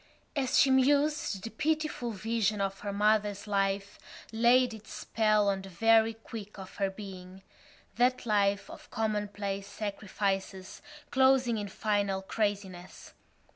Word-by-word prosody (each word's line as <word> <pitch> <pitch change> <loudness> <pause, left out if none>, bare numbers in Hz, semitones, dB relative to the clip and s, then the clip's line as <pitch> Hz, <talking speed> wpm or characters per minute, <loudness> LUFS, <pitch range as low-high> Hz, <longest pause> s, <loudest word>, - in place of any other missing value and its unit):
As 265 -3 +1
she 270 - +5
mused 280 -4 +2
the 225 - -5
pitiful 310 -5 -1
vision 215 0 -1
of 195 0 -2
her 205 - -4
mother's 205 0 +1
life 195 -1 -1 0.3
laid 240 +2 +4
its 215 -1 -12
spell 215 -2 +1
on 195 -1 +1
the 195 - -10
very 225 +4 +3
quick 220 -2 -9
of 190 -1 -10
her 195 -1 +1
being—that 195 +6 -4
life 200 -2 +1
of - - -12
commonplace 205 -3 -2
sacrifices 200 -2 -3 0.3
closing 260 -3 +3
in 205 - -4
final 200 -1 -1
craziness. 195 -3 -4
210 Hz, 125 wpm, -30 LUFS, 195-230 Hz, 0.3 s, she